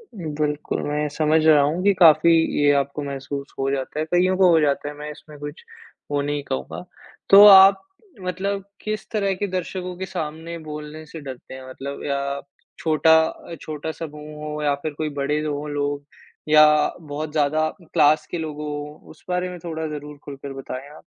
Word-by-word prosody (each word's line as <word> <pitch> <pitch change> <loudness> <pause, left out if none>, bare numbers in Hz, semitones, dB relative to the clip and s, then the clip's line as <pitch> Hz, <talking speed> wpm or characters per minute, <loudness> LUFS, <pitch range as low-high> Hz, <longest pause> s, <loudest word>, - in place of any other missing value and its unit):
बिल्कुल, 150 -4 -3
मैं 150 +1 -1
समझ 155 +1 +2
रहा 150 -2 +7
हूँ 155 +5 0
कि 200 0 +5
काफ़ी 170 0 +7 0.3
ये 145 0 +5
आपको 140 +1 -1
महसूस 140 0 -6
हो 135 - 0
जाता 140 +2 -3
है, 155 - 0
कइयों 180 +3 +2
को 185 -2 +5
हो 165 - +5
जाता 145 0 0
है, - - -7
मैं 150 +1 -7
इसमें 150 0 -13
कुछ 145 +1 -8 0.5
वो 145 0 +1
नहीं 145 0 -2
कहूँगा। 65 - -5 0.5
तो 200 +1 +10
आप 195 0 +9 0.4
मतलब 190 +2 -3 0.2
किस 215 -1 -4
तरह 200 -3 0
के 205 +2 -2
दर्शकों 180 0 -4
के 190 - -4
सामने 160 0 -5
बोलने 150 +1 -7
से 160 +2 -9
डरते 130 -2 -9
हैं? 130 0 -9
मतलब 140 +2 -7
या 140 0 -2 0.4
छोटा 160 0 +4
अ, 170 +1 -8
छोटा 155 +1 -5
समूह 150 -1 -9
हो 150 0 -4
या 145 -1 +2
फिर 155 -2 -3
कोई 155 +1 -3
बड़े 150 +2 0
हो 150 0 -3
लोग 145 0 -2 0.5
या 155 0 +8 0.4
बहुत 150 0 -5
ज़्यादा 155 +1 +1
क्लास 155 -2 +3
के 175 - -2
लोग 155 -2 -5
हो? 150 0 -6
उस - - -18
बारे 180 0 -1
में 180 - -7
थोड़ा 160 -2 -4
ज़रूर 150 -1 -7
खुलकर 140 -1 -8
बताएँ 135 +1 -7
आप। - - -15
150 Hz, 185 wpm, -22 LUFS, 145-165 Hz, 0.5 s, तो